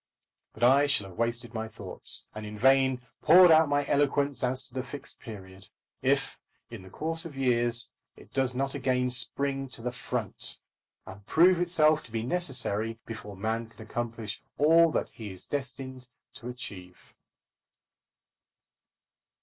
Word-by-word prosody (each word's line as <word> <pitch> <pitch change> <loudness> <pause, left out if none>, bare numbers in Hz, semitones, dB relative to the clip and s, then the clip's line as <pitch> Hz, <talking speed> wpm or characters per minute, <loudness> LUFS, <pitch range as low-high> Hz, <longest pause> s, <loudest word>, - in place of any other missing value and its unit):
But 110 - -6
I 135 +4 +6
shall 105 -9 +1
have 90 - -14
wasted 115 0 -2
my 110 -1 -3
thoughts, - - -5
and 110 - -7
in 105 0 -7
vain 130 +1 +3 0.2
poured 180 +2 +8
out 160 -1 +6
my 145 0 +1
eloquence 140 -1 +1
as 130 +1 +2
to - - -11
the 130 - -2
Fixed 140 +3 -7
Period, 95 -4 -11 0.3
if, - - 0 0.3
in - - -8
the 95 - -13
course 165 - -2
of 160 -4 -9
years, 120 -3 +1 0.3
it - - -18
does 130 -2 0
not 135 +1 -1
again 125 -2 0
spring 135 +1 -1
to 115 -2 -5
the 125 - -2
front, 125 - -1 0.5
and 95 +2 -11
prove 175 +2 +5
itself 155 -3 +4
to 115 - -14
be 115 0 -2
necessary 115 - 0
before 105 -3 -8
man 110 +3 -2
can 115 - -13
accomplish 115 -2 -4 0.2
all 165 +3 +6
that - - -1
he 110 -3 -9
is 95 - -10
destined 130 -2 -5 0.3
to 120 - -8
achieve. 90 -8 -9
125 Hz, 155 wpm, -28 LUFS, 115-140 Hz, 0.5 s, poured